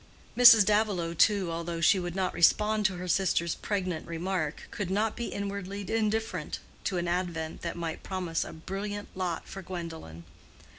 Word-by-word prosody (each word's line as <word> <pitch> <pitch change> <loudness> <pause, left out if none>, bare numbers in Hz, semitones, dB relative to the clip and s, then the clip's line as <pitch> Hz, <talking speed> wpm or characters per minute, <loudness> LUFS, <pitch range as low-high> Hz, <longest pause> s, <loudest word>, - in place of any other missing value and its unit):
Mrs. 230 -4 +9
Davilow, 205 -5 +1
too, 190 0 +3
although 170 0 -3
she 170 +3 +4
would 175 -1 -4
not 190 -1 0
respond 210 +4 +4
to 190 - -5
her 180 +1 -6
sister's 170 -2 +1
pregnant 185 -5 -3
remark, 170 -1 -2
could 205 -5 -4
not 210 +3 0
be 235 - -3
inwardly 200 0 -4
indifferent 215 -6 -1 0.3
to 185 - 0
an 175 0 -1
advent 170 -3 -2
that - - -4
might 165 -2 -4
promise 180 -4 -2
a - - -8
brilliant 200 +5 -5
lot 180 -3 -3
for 195 - -7
Gwendolen. 165 - -7
185 Hz, 160 wpm, -29 LUFS, 170-205 Hz, 0.3 s, Mrs